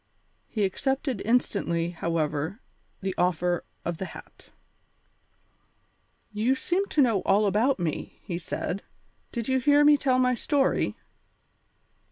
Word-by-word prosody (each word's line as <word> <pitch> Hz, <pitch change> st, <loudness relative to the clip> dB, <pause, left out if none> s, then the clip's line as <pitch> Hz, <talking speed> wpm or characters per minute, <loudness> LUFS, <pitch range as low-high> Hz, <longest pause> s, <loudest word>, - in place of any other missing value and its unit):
He 215 Hz, -, -1 dB
accepted 265 Hz, +3 st, -1 dB
instantly, 185 Hz, -8 st, +1 dB
however, 160 Hz, +2 st, -2 dB, 0.4 s
the 190 Hz, -1 st, -2 dB
offer 175 Hz, 0 st, +1 dB, 0.2 s
of 170 Hz, -1 st, -3 dB
the 190 Hz, -, -2 dB
hat. -, -, -12 dB, 1.8 s
"You 220 Hz, +5 st, +1 dB
seem 370 Hz, +8 st, 0 dB
to 295 Hz, -, +3 dB
know 225 Hz, -6 st, +2 dB
all 205 Hz, +2 st, +3 dB
about 220 Hz, +7 st, +2 dB
me," 170 Hz, -5 st, -4 dB
he 175 Hz, -2 st, -4 dB
said; 180 Hz, +2 st, -4 dB, 0.5 s
"did 235 Hz, -3 st, -4 dB
you 260 Hz, 0 st, +2 dB
hear 290 Hz, +3 st, +5 dB
me 295 Hz, 0 st, +7 dB
tell 260 Hz, -2 st, +2 dB
my 250 Hz, 0 st, +3 dB
story?" 270 Hz, +3 st, +1 dB
210 Hz, 125 wpm, -27 LUFS, 175-265 Hz, 1.8 s, me